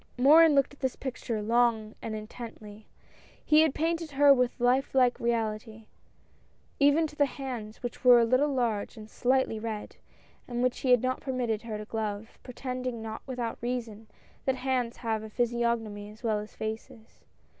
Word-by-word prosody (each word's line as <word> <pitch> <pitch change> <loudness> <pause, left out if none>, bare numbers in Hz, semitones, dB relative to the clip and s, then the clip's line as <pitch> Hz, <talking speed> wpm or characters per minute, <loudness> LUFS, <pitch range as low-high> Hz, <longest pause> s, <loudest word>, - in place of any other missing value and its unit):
Morin 300 +4 +7
looked 275 0 +2
at 285 - -18
this 260 -2 -1
picture 240 -4 -4
long 225 -1 +2
and 220 - -4
intently. 215 -1 -9 0.6
He 305 0 +6
had 315 -3 +2
painted 330 +1 -1
her 285 0 +7
with 250 -2 0
life 255 +3 +2
like 250 -2 +3
reality, 220 -1 -2 0.9
even 290 +3 +4
to 300 - -8
the 285 -1 +3
hands, 245 -6 -7
which 245 - -6
were 245 -1 +8
a 230 - +4
little 255 +5 +2
large 235 -4 -1
and 215 -1 -9
slightly 255 -1 0
red, 215 -1 -6 0.5
and 240 0 -2
which 255 -1 0
he 260 - -2
had 250 -1 +5
not 255 0 -1
permitted 245 -5 -2
her 225 -2 -5
to 210 - -7
glove, 215 -1 -5
pretending, 250 -2 -5
not 220 -1 -6
without 245 -3 -4
reason, 230 -3 -4 0.4
that 265 - +1
hands 255 -2 -1
have 220 -2 -2
a 220 - -8
physiognomy 235 -3 -1
as 215 +3 -15
well 215 -2 +1
as 210 +1 -9
faces. 220 +1 -7
240 Hz, 170 wpm, -28 LUFS, 220-260 Hz, 0.9 s, were